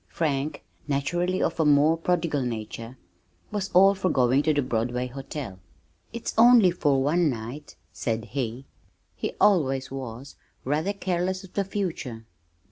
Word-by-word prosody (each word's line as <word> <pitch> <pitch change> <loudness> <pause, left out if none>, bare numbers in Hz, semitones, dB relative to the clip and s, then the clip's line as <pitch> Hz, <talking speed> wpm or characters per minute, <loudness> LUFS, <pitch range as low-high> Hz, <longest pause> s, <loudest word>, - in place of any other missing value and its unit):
Frank, 145 -2 -2 0.2
naturally 175 +6 0
of - - -1
a - - +4
more 150 +2 +5
prodigal 165 -3 0
nature, 115 0 -5 0.5
was 205 -2 -2
all 195 +2 +6
for 190 -1 -1
going 130 -1 +3
to 155 - +2
the 145 -2 +1
Broadway 125 +1 -1
Hotel. 130 -5 -7 0.5
"It's 235 0 -5
only 230 -5 +7
for 145 -6 +1
one 165 +3 +2
night," 125 +4 -6 0.2
said 110 +4 -2
he. 125 0 -4 0.5
He - - -4
always 135 -11 +2
was 130 0 -7 0.3
rather 155 +9 0
careless 185 -1 -2
of 190 - -14
the 200 - 0
future! 165 - -4
145 Hz, 140 wpm, -26 LUFS, 125-180 Hz, 0.5 s, only